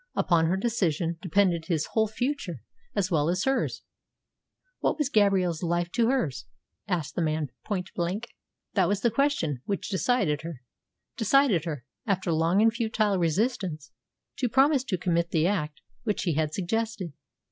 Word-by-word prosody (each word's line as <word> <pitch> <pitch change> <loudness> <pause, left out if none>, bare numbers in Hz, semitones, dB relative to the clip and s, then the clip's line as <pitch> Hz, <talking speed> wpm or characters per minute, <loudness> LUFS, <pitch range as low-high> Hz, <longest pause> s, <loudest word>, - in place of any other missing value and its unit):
Upon 165 -2 +3
her 185 +3 +1
decision 175 -7 0
depended 180 -2 +2
his 160 -3 0
whole 220 -1 +2
future 220 - -3 0.3
as 195 -2 0
well 155 -1 +2
as 180 +1 0
hers. 270 0 0 1.0
What - - +1
was 300 -4 0
Gabrielle's 190 - +2
life 175 0 0
to 235 -1 +2
hers, 150 - -1 0.4
asked 165 -6 -2
the - - -1
man 155 -3 -1
point 190 -4 -3
blank. 190 +7 -2 0.4
That 190 -4 +3
was 200 +1 0
the 235 - +2
question 230 - 0
which 200 -2 -2
decided 190 - +1
her 160 -6 -8 0.5
decided 225 - +3
her, 145 -7 -4 0.2
after 190 -3 0
long 165 +6 +3
and 225 0 +4
futile 220 -4 +1
resistance, 175 - -1 0.5
to 250 -3 +1
promise 270 +2 +4
to 190 -8 -1
commit 170 -1 0
the 160 -2 +2
act 150 - -1 0.2
which 210 - -1
he 170 - +1
had 155 0 0
suggested. 195 -1 -2
185 Hz, 160 wpm, -27 LUFS, 165-220 Hz, 1.0 s, and